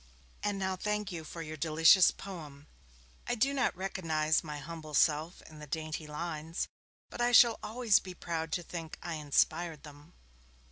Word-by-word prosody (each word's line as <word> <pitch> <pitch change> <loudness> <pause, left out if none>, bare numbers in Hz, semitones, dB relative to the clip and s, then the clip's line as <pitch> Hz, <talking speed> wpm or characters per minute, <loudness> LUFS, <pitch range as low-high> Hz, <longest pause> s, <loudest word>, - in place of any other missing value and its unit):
And 205 -1 -1
now 190 -1 -1
thank 210 +1 -2
you 165 -2 -5
for 165 +1 -7
your 155 0 -6
delicious 160 +4 +6
poem; 150 -7 -9 0.6
I - - 0
do 270 +5 +2
not 255 -9 0
recognize 160 -5 0
my 150 -2 -6
humble 155 +1 -7
self 155 +4 +2
in 155 -1 -13
the 150 - -9
dainty 155 +1 -4
lines, 160 +1 -4 0.4
but - - -5
I 240 0 +3
shall 235 -1 +7
always 225 -2 +3
be 185 -1 -9
proud 165 -2 -4
to 175 - -1
think 165 -2 -7
I 170 -1 -4
inspired 155 +1 0
them. 150 +3 -14
165 Hz, 170 wpm, -31 LUFS, 155-190 Hz, 0.6 s, shall